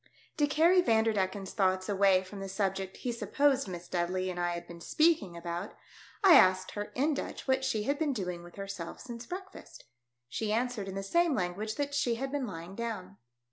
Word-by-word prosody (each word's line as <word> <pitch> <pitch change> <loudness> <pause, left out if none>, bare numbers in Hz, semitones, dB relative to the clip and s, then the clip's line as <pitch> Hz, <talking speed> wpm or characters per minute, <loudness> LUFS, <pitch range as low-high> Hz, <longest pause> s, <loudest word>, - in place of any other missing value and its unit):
To 295 -2 +3
carry 335 +5 +5
Vanderdecken's 210 - +1
thoughts 185 -2 +1
away 195 -2 +4
from 195 +2 -9
the 195 0 -5
subject 195 -1 -2
he 245 - -3
supposed 265 +4 +1
Miss 175 -1 -7
Dudley 185 +1 -1
and 175 - -6
I 175 0 0
had 170 0 -6
been 170 0 -11
speaking 300 - +2
about, 170 +3 -5 0.5
I 380 -3 +9
asked 185 -2 +4
her 205 0 -3
in 290 +5 +2
Dutch 280 - -5
what 265 0 +2
she 260 -5 0
had 280 +6 0
been 310 -3 +1
doing 180 -8 -3
with 175 0 -13
her 195 0 -6
self 175 -4 -6
since 235 -1 -8
breakfast. 380 +1 -9 0.4
She 210 - -2
answered 230 -2 -1
in 195 - -5
the 195 - -3
same 340 - +2
language 205 +3 -2
that 285 0 -2
she 240 -4 +1
had 265 +3 -4
been 280 -3 -2
lying 170 +1 -7
down. 200 -5 -5
205 Hz, 200 wpm, -31 LUFS, 185-265 Hz, 0.5 s, I